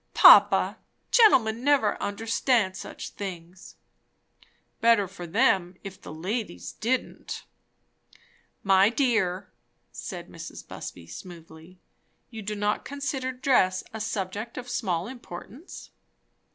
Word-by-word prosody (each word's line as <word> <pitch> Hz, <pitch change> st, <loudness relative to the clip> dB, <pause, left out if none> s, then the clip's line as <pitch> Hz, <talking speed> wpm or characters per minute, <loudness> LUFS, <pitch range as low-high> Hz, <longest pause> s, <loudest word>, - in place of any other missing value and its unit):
"Papa, -, -, +7 dB, 0.3 s
gentlemen 245 Hz, -, +5 dB
never 280 Hz, -6 st, +2 dB
understand 225 Hz, -1 st, 0 dB
such -, -, -7 dB
things." 180 Hz, -2 st, -8 dB, 1.0 s
"Better 230 Hz, -4 st, +4 dB
for 180 Hz, -2 st, -9 dB
them 185 Hz, -3 st, +2 dB
if 195 Hz, -2 st, -9 dB
the -, -, -9 dB
ladies 160 Hz, -, -4 dB
didn't." 250 Hz, +4 st, -3 dB, 1.2 s
"My 195 Hz, +1 st, +5 dB
dear," 205 Hz, -8 st, 0 dB, 0.4 s
said -, -, -7 dB
Mrs. -, -, -10 dB
Busby 85 Hz, -2 st, -8 dB
smoothly, 165 Hz, -, -12 dB, 0.5 s
"you 225 Hz, -2 st, -7 dB
do 210 Hz, +1 st, -4 dB
not 205 Hz, 0 st, -1 dB
consider 270 Hz, -2 st, -3 dB
dress 250 Hz, -8 st, +2 dB
a 220 Hz, -, -5 dB
subject 210 Hz, +1 st, -4 dB
of 250 Hz, -1 st, -6 dB
small 180 Hz, -8 st, -1 dB
importance?" 245 Hz, -, -10 dB
205 Hz, 105 wpm, -26 LUFS, 185-240 Hz, 1.2 s, Papa